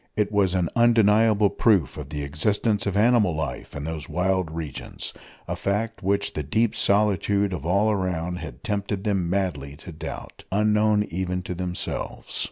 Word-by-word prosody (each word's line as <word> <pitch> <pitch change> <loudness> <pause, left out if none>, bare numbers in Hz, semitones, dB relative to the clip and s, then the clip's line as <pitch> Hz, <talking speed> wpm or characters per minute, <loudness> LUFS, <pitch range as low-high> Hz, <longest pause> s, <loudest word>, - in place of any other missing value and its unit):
It 105 -1 +1
was 100 -3 +2
an 90 -2 +1
undeniable 110 -3 +4
proof 105 -7 +2
of 75 -3 -7
the 75 -1 -4
existence 100 +9 0
of 100 0 0
animal 105 -6 +4
life 80 -1 -4
in 70 - -5
those 80 -1 -5
wild 95 -1 0
regions, 80 -3 -6 0.3
a - - -2
fact 110 +3 -2
which 100 +1 0
the 75 - -2
deep 105 +11 +1
solitude 100 -1 +2
of 85 -3 -4
all 100 +5 +3
around 90 -3 -1
had - - -9
tempted 100 -3 -2
them 95 -5 0
madly 85 -8 -2
to 85 - -10
doubt 80 +1 -8
unknown 105 +1 +3
even 90 +1 -2
to 90 - -4
themselves. 90 0 -4
95 Hz, 165 wpm, -25 LUFS, 85-105 Hz, 0.3 s, undeniable